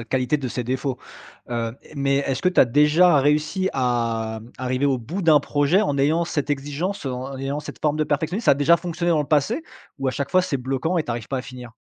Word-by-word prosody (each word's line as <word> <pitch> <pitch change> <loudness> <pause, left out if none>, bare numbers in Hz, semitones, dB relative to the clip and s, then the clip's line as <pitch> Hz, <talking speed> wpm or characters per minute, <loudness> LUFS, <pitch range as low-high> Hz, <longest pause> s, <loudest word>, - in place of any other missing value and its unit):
la - - -10
qualité 130 +4 0
de 135 -4 -4
ses 125 0 -4
défauts, 130 +1 -2 0.5
heu, 115 0 -3
et - - -16
mais, 140 0 +1
est-ce 135 -2 -1
que 180 - +4
tu 180 - +3
as - - +8
déjà 150 +6 +4
réussi 150 +6 +1
à 115 -3 -1 0.2
arriver 130 +2 0
au 135 -3 +1
bout 165 - -5
d'un 155 -3 +5
projet 145 +6 +2
en 140 -8 -1
ayant 155 +5 +2
cette 150 -4 -3
exigence, 145 +7 -3
heu, 130 - -2
en 130 +2 -5
ayant 140 +2 -3
cette - - -10
forme 150 -1 +1
de 155 - +1
perfectionnisme? 160 +9 -2
Ça - - +7
a - - +3
déjà 145 +5 +4
fonctionné 175 0 -2
dans 155 -2 +3
le 145 - -4
passé 155 - +1 0.4
ou 135 - -1
à - - +2
chaque 140 +1 -4
fois 185 0 +4
c'est 155 -6 -1
bloquant 135 +7 -1
et 155 - -1
tu - - -5
arrives 115 -2 -4
pas 135 - -2
à - - -4
finir? 125 -2 -10
140 Hz, 255 wpm, -23 LUFS, 130-160 Hz, 0.5 s, as